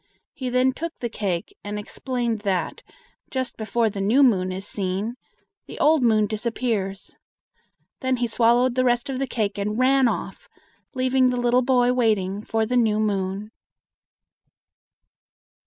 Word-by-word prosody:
He 255 Hz, -2 st, -4 dB
then 255 Hz, +1 st, +2 dB
took 335 Hz, +4 st, -6 dB
the 240 Hz, -, -4 dB
cake, 190 Hz, -6 st, -3 dB
and 205 Hz, 0 st, -4 dB
explained 235 Hz, +1 st, -3 dB
that, 190 Hz, -5 st, -2 dB, 0.5 s
just 260 Hz, -1 st, -3 dB
before 225 Hz, +1 st, 0 dB
the 200 Hz, -2 st, -3 dB
new 230 Hz, +9 st, +4 dB
moon 185 Hz, -8 st, +3 dB
is 190 Hz, +2 st, -5 dB
seen, 200 Hz, +3 st, -2 dB, 0.5 s
the -, -, -9 dB
old 310 Hz, 0 st, +4 dB
moon 215 Hz, -3 st, +4 dB
disappears. 215 Hz, -2 st, -3 dB, 0.8 s
Then 260 Hz, -1 st, 0 dB
he 240 Hz, -, 0 dB
swallowed 240 Hz, +2 st, +3 dB
the 255 Hz, +1 st, +1 dB
rest 245 Hz, +1 st, +1 dB
of 260 Hz, -, -3 dB
the 270 Hz, -, -1 dB
cake 210 Hz, -4 st, -2 dB
and 210 Hz, +2 st, -2 dB
ran 260 Hz, +1 st, +4 dB
off, -, -, -4 dB, 0.5 s
leaving 255 Hz, 0 st, +3 dB
the 250 Hz, -, -1 dB
little 245 Hz, +1 st, +3 dB
boy 250 Hz, -1 st, +3 dB
waiting 210 Hz, -5 st, 0 dB
for 225 Hz, -1 st, 0 dB
the 250 Hz, +3 st, 0 dB
new 220 Hz, -3 st, +2 dB
moon. 200 Hz, 0 st, -2 dB
230 Hz, 150 wpm, -23 LUFS, 205-255 Hz, 0.8 s, new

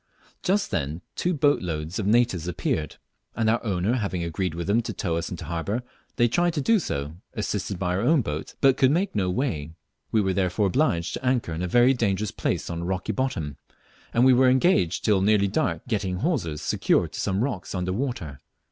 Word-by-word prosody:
Just 195 Hz, +2 st, +1 dB
then 75 Hz, +5 st, -2 dB
two 180 Hz, -, 0 dB
boats 145 Hz, -3 st, +2 dB
load 80 Hz, +1 st, -3 dB
of 100 Hz, -, -1 dB
natives 105 Hz, -6 st, +2 dB
appeared, 80 Hz, -3 st, -2 dB, 0.4 s
and 110 Hz, -, 0 dB
our 115 Hz, +2 st, +2 dB
owner 100 Hz, 0 st, 0 dB
having 95 Hz, -6 st, -2 dB
agreed 85 Hz, +1 st, -2 dB
with 85 Hz, 0 st, -3 dB
them 105 Hz, +4 st, +2 dB
to 115 Hz, -1 st, -5 dB
tow 85 Hz, -3 st, -2 dB
us 85 Hz, +1 st, -2 dB
into 85 Hz, -2 st, -6 dB
harbour, 90 Hz, -, -2 dB, 0.3 s
they 120 Hz, -, +4 dB
tried 175 Hz, +7 st, +1 dB
to -, -, 0 dB
do 225 Hz, +9 st, +3 dB
so, 75 Hz, -, -4 dB, 0.2 s
assisted 100 Hz, -, -2 dB
by 90 Hz, -1 st, -1 dB
our 95 Hz, -, 0 dB
own 135 Hz, +3 st, +3 dB
boat, 75 Hz, -4 st, -5 dB
but 135 Hz, -1 st, +5 dB
could 130 Hz, -, +5 dB
make 180 Hz, +7 st, +1 dB
no 95 Hz, -3 st, 0 dB
way. 90 Hz, -, -2 dB, 0.4 s
We 110 Hz, -, +3 dB
were 95 Hz, -1 st, 0 dB
therefore 95 Hz, +2 st, +1 dB
obliged 95 Hz, -, +1 dB
to -, -, -5 dB
anchor 125 Hz, -9 st, 0 dB
in 80 Hz, -, -4 dB
a 90 Hz, -, -1 dB
very 120 Hz, +7 st, +5 dB
dangerous 105 Hz, -4 st, 0 dB
place -, -, -2 dB
on 85 Hz, -1 st, -4 dB
a -, -, -4 dB
rocky 95 Hz, +3 st, -2 dB
bottom, 90 Hz, -, -2 dB, 0.5 s
and 120 Hz, +2 st, +3 dB
we 130 Hz, -, +7 dB
were 130 Hz, +1 st, +5 dB
engaged 130 Hz, -, +2 dB
till 100 Hz, -3 st, +3 dB
nearly 100 Hz, 0 st, +3 dB
dark 140 Hz, +11 st, -1 dB
getting 100 Hz, -5 st, -1 dB
hawsers 95 Hz, -, -1 dB
secured -, -, +1 dB
to -, -, -7 dB
some 95 Hz, +3 st, 0 dB
rocks 105 Hz, -9 st, -3 dB
under 90 Hz, 0 st, -1 dB
water. 95 Hz, -, -3 dB
100 Hz, 210 wpm, -25 LUFS, 85-125 Hz, 0.5 s, we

